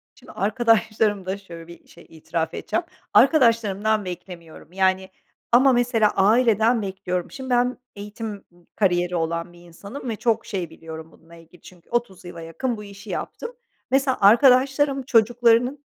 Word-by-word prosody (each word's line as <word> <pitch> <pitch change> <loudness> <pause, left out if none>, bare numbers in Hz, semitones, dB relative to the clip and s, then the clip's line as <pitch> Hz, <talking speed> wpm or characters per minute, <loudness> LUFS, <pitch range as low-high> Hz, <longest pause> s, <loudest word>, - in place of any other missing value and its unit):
Şimdi, - - -15
arkadaşlarımda 215 -3 0
şöyle 170 -4 -12
bir 170 - -15
şey 170 - -17
itiraf 160 0 -4
edeceğim. 350 - -2 0.3
Arkadaşlarımdan 220 - +3
beklemiyorum 175 -3 -10
yani, 190 0 +1 0.4
ama 260 +2 +5
mesela 235 -3 +2
aileden 225 +2 +3
bekliyorum. 190 -3 -4
Şimdi, 265 -1 -8
ben 245 0 +1 0.2
eğitim 210 +2 -7 0.2
m 175 0 -25
kariyeri 180 -3 +1
olan 170 +1 -3
bir 175 - -17
insanım 200 +10 -9
ve 225 - -2
çok 230 +1 0
şey 185 -5 -4
biliyorum 160 0 -10
bununla 165 +1 -18
ilgili. 165 +1 -18
Çünkü 175 -2 -17
30 235 -7 -3
yıla 175 -1 -9
yakın 220 +10 -4
bu 210 - -9
işi 200 +1 -12
yaptım. 475 - -5 0.4
Mesela, 270 0 +2
arkadaşlarım 270 +5 +4
çocuklarının 240 +3 +2
205 Hz, 145 wpm, -23 LUFS, 175-240 Hz, 0.4 s, ama